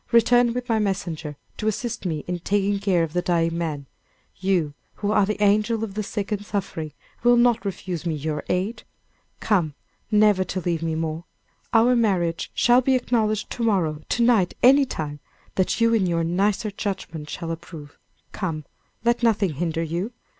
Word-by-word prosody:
Return 240 Hz, 0 st, +5 dB
with 250 Hz, 0 st, -3 dB
my 225 Hz, -3 st, +2 dB
messenger, 170 Hz, -7 st, -3 dB, 0.2 s
to 215 Hz, -, -2 dB
assist 220 Hz, -1 st, -2 dB
me 155 Hz, -3 st, -3 dB
in 180 Hz, 0 st, -2 dB
taking 200 Hz, +2 st, 0 dB
care 190 Hz, -4 st, +2 dB
of 160 Hz, -1 st, -4 dB
the 180 Hz, -, +1 dB
dying 165 Hz, -2 st, +1 dB
man. 155 Hz, -4 st, -3 dB, 0.5 s
You, 180 Hz, -6 st, 0 dB, 0.2 s
who 205 Hz, 0 st, -2 dB
are 205 Hz, -2 st, +3 dB
the 215 Hz, -, -2 dB
angel 215 Hz, +2 st, +2 dB
of 210 Hz, -3 st, -4 dB
the 215 Hz, -, -2 dB
sick 205 Hz, 0 st, -4 dB
and 205 Hz, -1 st, -1 dB
suffering, 175 Hz, -7 st, -4 dB, 0.3 s
will 240 Hz, 0 st, +5 dB
not 240 Hz, -1 st, +3 dB
refuse 185 Hz, -4 st, -4 dB
me 165 Hz, -3 st, -1 dB
your 150 Hz, +1 st, -3 dB
aid. 190 Hz, +6 st, -1 dB, 0.6 s
Come, 170 Hz, -9 st, +1 dB, 0.3 s
never 210 Hz, -3 st, +4 dB
to 185 Hz, +1 st, -3 dB
leave 170 Hz, -2 st, -1 dB
me 165 Hz, -1 st, -1 dB
more! 160 Hz, +1 st, -3 dB, 0.5 s
Our 235 Hz, +2 st, +5 dB
marriage 185 Hz, -8 st, +1 dB
shall 245 Hz, +1 st, +5 dB
be 265 Hz, +1 st, +2 dB
acknowledged 220 Hz, -4 st, 0 dB
to 240 Hz, -, -5 dB
morrow, 170 Hz, -9 st, +1 dB
to 235 Hz, -, +2 dB
night, 225 Hz, -7 st, +3 dB
any 275 Hz, +3 st, +7 dB
time, 150 Hz, -, -5 dB, 0.3 s
that 185 Hz, +4 st, 0 dB
you 230 Hz, 0 st, +4 dB
in 205 Hz, -5 st, +3 dB
your 170 Hz, -1 st, +1 dB
nicer 200 Hz, +5 st, 0 dB
judgment, 185 Hz, -7 st, -5 dB
shall 165 Hz, +1 st, -4 dB
approve. 160 Hz, -3 st, -9 dB, 0.3 s
Come! 160 Hz, -6 st, -4 dB, 0.4 s
let 235 Hz, +1 st, +2 dB
nothing 215 Hz, -7 st, +2 dB
hinder 165 Hz, +2 st, -1 dB
you. 175 Hz, +8 st, -3 dB
195 Hz, 175 wpm, -24 LUFS, 165-220 Hz, 0.6 s, any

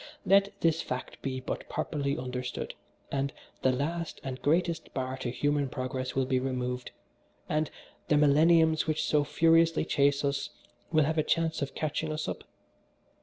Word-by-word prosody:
Let 200 Hz, +1 st, +4 dB
this 165 Hz, -1 st, +3 dB
fact 125 Hz, -, -5 dB
be 130 Hz, -1 st, -3 dB
but -, -, -5 dB
properly 140 Hz, -2 st, -1 dB
understood, 125 Hz, 0 st, -4 dB, 0.4 s
and 140 Hz, 0 st, 0 dB, 0.3 s
the 130 Hz, -, +4 dB
last 160 Hz, +6 st, -2 dB
and 130 Hz, -1 st, -5 dB
greatest 165 Hz, +1 st, +1 dB
bar 130 Hz, 0 st, -2 dB
to 130 Hz, -, -3 dB
human 145 Hz, +2 st, 0 dB
progress 130 Hz, 0 st, -3 dB
will 135 Hz, -1 st, +2 dB
be 130 Hz, 0 st, +1 dB
removed, 125 Hz, -1 st, -2 dB, 0.6 s
and 155 Hz, 0 st, 0 dB, 0.4 s
'the 150 Hz, -, +4 dB
millenniums 160 Hz, +2 st, +5 dB
which 155 Hz, -1 st, 0 dB
so 150 Hz, -1 st, +3 dB
furiously 165 Hz, +2 st, +3 dB
chase 140 Hz, 0 st, +2 dB
us' 140 Hz, 0 st, -1 dB, 0.4 s
will 155 Hz, -2 st, +4 dB
have 160 Hz, +1 st, 0 dB
a -, -, +3 dB
chance 165 Hz, 0 st, 0 dB
of 140 Hz, -, -3 dB
catching 155 Hz, 0 st, -2 dB
us 155 Hz, 0 st, -3 dB
up. -, -, -5 dB
145 Hz, 160 wpm, -29 LUFS, 130-160 Hz, 0.6 s, millenniums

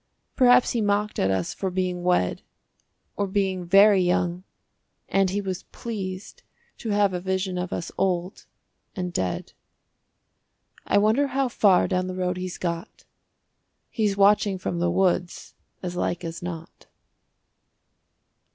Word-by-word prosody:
Perhaps 250 Hz, -1 st, +5 dB
he 235 Hz, -, 0 dB
mocked 205 Hz, 0 st, 0 dB
at 95 Hz, -, +2 dB
us 95 Hz, -2 st, -1 dB
for 190 Hz, -, -3 dB
being 180 Hz, -1 st, -2 dB
wed, 175 Hz, -, +1 dB, 0.7 s
Or 200 Hz, -, -1 dB
being 190 Hz, -2 st, -1 dB
very 195 Hz, +1 st, +6 dB
young 175 Hz, 0 st, 0 dB, 0.6 s
(and 195 Hz, -1 st, +2 dB
he 200 Hz, +2 st, -1 dB
was 190 Hz, -2 st, -4 dB
pleased 195 Hz, -5 st, -6 dB, 0.4 s
To 225 Hz, -, -5 dB
have 205 Hz, -2 st, +2 dB
a 180 Hz, -, -2 dB
vision 190 Hz, 0 st, -2 dB
of 180 Hz, 0 st, -4 dB
us 170 Hz, -, -4 dB
old 180 Hz, -1 st, -1 dB, 0.5 s
and 180 Hz, -2 st, -4 dB
dead). 90 Hz, -, -3 dB, 1.3 s
I -, -, +3 dB
wonder 220 Hz, +8 st, +3 dB
how 270 Hz, -1 st, 0 dB
far 200 Hz, -5 st, +4 dB
down 185 Hz, -1 st, -1 dB
the 185 Hz, -, -5 dB
road 180 Hz, -1 st, -1 dB
he's 185 Hz, -1 st, -5 dB
got. 170 Hz, +2 st, -5 dB, 0.9 s
He's 210 Hz, -4 st, 0 dB
watching 200 Hz, 0 st, +4 dB
from 175 Hz, -1 st, -3 dB
the 175 Hz, 0 st, +1 dB
woods 180 Hz, -1 st, 0 dB, 0.3 s
as 180 Hz, -1 st, -4 dB
like 175 Hz, 0 st, -2 dB
as 165 Hz, 0 st, -6 dB
not. 170 Hz, -2 st, -8 dB
185 Hz, 140 wpm, -25 LUFS, 180-205 Hz, 1.3 s, very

